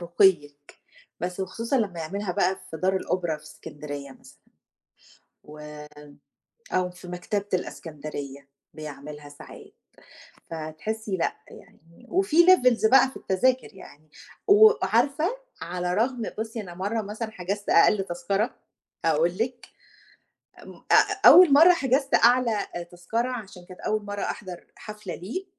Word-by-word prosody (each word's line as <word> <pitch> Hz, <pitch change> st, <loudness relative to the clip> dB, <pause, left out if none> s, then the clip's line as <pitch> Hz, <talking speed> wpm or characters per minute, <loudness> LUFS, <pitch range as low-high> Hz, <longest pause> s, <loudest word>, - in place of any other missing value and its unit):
رُقيِّك، 170 Hz, -5 st, +1 dB, 0.5 s
بس 180 Hz, +2 st, -4 dB
وخصوصًا 230 Hz, +8 st, -2 dB
لمّا 195 Hz, -8 st, -1 dB
يعملها 195 Hz, +4 st, -4 dB
بقى 190 Hz, +2 st, 0 dB
في 160 Hz, -, -6 dB
دار 190 Hz, +3 st, +1 dB
الأوبرا 175 Hz, -4 st, -2 dB
في 150 Hz, -, -19 dB
إسكندرية 145 Hz, -2 st, -9 dB
مثلًا، -, -, -18 dB, 1.0 s
وم 150 Hz, -1 st, -12 dB, 0.6 s
أو 185 Hz, -1 st, 0 dB
في 180 Hz, 0 st, -13 dB
مكتبة 195 Hz, +3 st, -3 dB
الإسكندرية 145 Hz, -5 st, -6 dB, 0.3 s
بيعملها 150 Hz, -1 st, -9 dB
ساعات، 145 Hz, -, -13 dB, 0.8 s
فتحسّي 190 Hz, +7 st, -4 dB
لأ، 170 Hz, -, -1 dB
يعني 170 Hz, +9 st, -18 dB
وفي 345 Hz, -2 st, +3 dB
levels 250 Hz, -11 st, +5 dB
بقى 265 Hz, 0 st, +6 dB
في -, -, -18 dB
التذاكر 250 Hz, +7 st, 0 dB
يعني. 155 Hz, -5 st, -15 dB, 0.4 s
و 430 Hz, +1 st, +8 dB
عارفة 275 Hz, -, +1 dB, 0.2 s
على 180 Hz, +1 st, -3 dB
رغم 235 Hz, +4 st, 0 dB, 0.2 s
بُصّي، 225 Hz, +1 st, -4 dB
أنا 180 Hz, -4 st, -9 dB
مرّة 205 Hz, +5 st, -2 dB
مثلًا 215 Hz, +2 st, -6 dB
حجزت 200 Hz, +1 st, -4 dB
أقل 195 Hz, +3 st, +4 dB
تذكرة، 195 Hz, +5 st, -2 dB, 0.5 s
هاقول 165 Hz, +2 st, +2 dB
لِك 245 Hz, +2 st, -3 dB, 1.0 s
ام -, -, -12 dB, 0.2 s
أ -, -, +5 dB
أول 355 Hz, -5 st, +9 dB
مرّة 330 Hz, +5 st, +8 dB
حجزت 270 Hz, -3 st, +1 dB
أعلى 240 Hz, -2 st, +4 dB, 0.2 s
آآ 175 Hz, -, -4 dB
تذكرة 180 Hz, +9 st, -3 dB
عشان 200 Hz, -7 st, -8 dB
كانت 185 Hz, 0 st, -13 dB
أول 215 Hz, 0 st, -1 dB
مرّة 205 Hz, 0 st, -5 dB
أحضَر 185 Hz, -3 st, -6 dB
حفلة 210 Hz, -4 st, -8 dB
ليه، 240 Hz, -, -6 dB
190 Hz, 130 wpm, -25 LUFS, 165-230 Hz, 1.0 s, أول